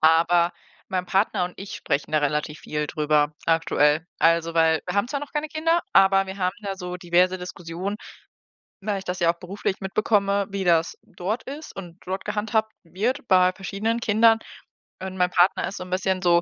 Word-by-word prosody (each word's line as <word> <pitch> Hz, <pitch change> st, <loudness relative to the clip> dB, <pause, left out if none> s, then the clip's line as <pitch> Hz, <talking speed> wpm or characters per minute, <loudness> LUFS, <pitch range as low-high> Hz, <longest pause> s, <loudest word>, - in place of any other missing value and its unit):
aber 170 Hz, +2 st, +4 dB, 0.4 s
mein 185 Hz, -2 st, -1 dB
Partner 190 Hz, -1 st, +1 dB
und 180 Hz, -, -6 dB
ich 195 Hz, +1 st, -8 dB
sprechen 140 Hz, +2 st, -2 dB
da 155 Hz, -, +4 dB
relativ 150 Hz, +1 st, -1 dB
viel 150 Hz, 0 st, -3 dB
drüber 150 Hz, -1 st, +1 dB
aktuell. 160 Hz, -1 st, +2 dB
Also, 165 Hz, 0 st, +3 dB
weil 160 Hz, -1 st, +4 dB
wir -, -, -3 dB
haben 200 Hz, +4 st, +1 dB
zwar 280 Hz, -, -2 dB
noch 290 Hz, -, -8 dB
keine 300 Hz, +1 st, -2 dB
Kinder, 330 Hz, +2 st, +1 dB
aber 195 Hz, 0 st, +5 dB
wir 190 Hz, 0 st, -7 dB
haben 185 Hz, 0 st, 0 dB
da 195 Hz, -1 st, -4 dB
so 180 Hz, -1 st, -5 dB
diverse 180 Hz, +1 st, +2 dB
Diskussionen, 180 Hz, +2 st, -5 dB, 0.9 s
weil 205 Hz, 0 st, -1 dB
ich 190 Hz, -, -6 dB
das 180 Hz, 0 st, -3 dB
ja 170 Hz, -1 st, +4 dB
auch 170 Hz, -, -15 dB
beruflich 190 Hz, +1 st, -3 dB
mitbekomme, 200 Hz, 0 st, +1 dB
wie 195 Hz, -1 st, -3 dB
das 170 Hz, -2 st, +2 dB
dort 205 Hz, +7 st, -4 dB
ist 295 Hz, +3 st, -8 dB
und 175 Hz, -3 st, -9 dB
dort 190 Hz, +1 st, -4 dB
gehandhabt 220 Hz, +1 st, 0 dB
wird 225 Hz, -, -2 dB
bei 185 Hz, -1 st, +5 dB
verschiedenen 200 Hz, +5 st, -2 dB
Kindern. 225 Hz, 0 st, +4 dB, 0.6 s
Und 190 Hz, 0 st, -6 dB
mein 180 Hz, 0 st, +2 dB
Partner 180 Hz, +1 st, +3 dB
ist 195 Hz, -, -6 dB
so -, -, -5 dB
'n 180 Hz, -, -11 dB
bisschen 185 Hz, 0 st, 0 dB
so, 175 Hz, -1 st, +4 dB
185 Hz, 190 wpm, -24 LUFS, 170-200 Hz, 0.9 s, aber